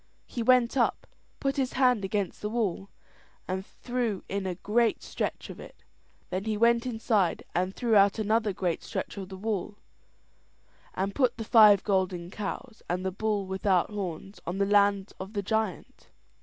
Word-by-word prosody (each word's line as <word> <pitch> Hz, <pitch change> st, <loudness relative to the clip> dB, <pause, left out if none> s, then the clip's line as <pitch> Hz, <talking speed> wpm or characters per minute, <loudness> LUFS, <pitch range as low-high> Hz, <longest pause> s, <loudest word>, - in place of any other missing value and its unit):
He 240 Hz, -, -5 dB
went 245 Hz, +1 st, +4 dB
up, 240 Hz, -, +1 dB, 0.3 s
put 275 Hz, +1 st, -1 dB
his 265 Hz, -2 st, -1 dB
back 250 Hz, -5 st, +3 dB
against 195 Hz, -1 st, -2 dB
the 210 Hz, -, -2 dB
wall, 205 Hz, -4 st, -2 dB, 0.6 s
and 190 Hz, +1 st, -2 dB
threw 240 Hz, -2 st, -3 dB
in 195 Hz, -1 st, -2 dB
a 180 Hz, -, -2 dB
great 220 Hz, +5 st, +1 dB
stretch -, -, -3 dB
of -, -, -11 dB
it; -, -, -13 dB, 0.5 s
then 185 Hz, +2 st, -2 dB
he 215 Hz, -1 st, -1 dB
went 235 Hz, +2 st, +3 dB
inside 220 Hz, -6 st, +1 dB
and 185 Hz, +2 st, -1 dB
threw 235 Hz, -3 st, +1 dB
out 200 Hz, +1 st, +5 dB
another 220 Hz, 0 st, +1 dB
great 180 Hz, -3 st, -2 dB
stretch -, -, -5 dB
of 190 Hz, -2 st, -6 dB
the 190 Hz, -, -8 dB
wall, 205 Hz, 0 st, -3 dB, 1.2 s
and 195 Hz, +2 st, -1 dB
put 250 Hz, -3 st, +1 dB
the 225 Hz, -, -4 dB
five 210 Hz, -3 st, +7 dB
golden 185 Hz, -3 st, 0 dB
cows 220 Hz, +4 st, -6 dB
and 180 Hz, +2 st, -1 dB
the 190 Hz, -, 0 dB
bull 205 Hz, +1 st, -1 dB
without 190 Hz, 0 st, +1 dB
horns 195 Hz, -1 st, -5 dB
on 175 Hz, +2 st, -2 dB
the 200 Hz, -, +2 dB
land 200 Hz, -1 st, +3 dB
of 190 Hz, +3 st, -7 dB
the 200 Hz, -2 st, -2 dB
giant. 220 Hz, -4 st, -3 dB
205 Hz, 170 wpm, -28 LUFS, 190-225 Hz, 1.2 s, five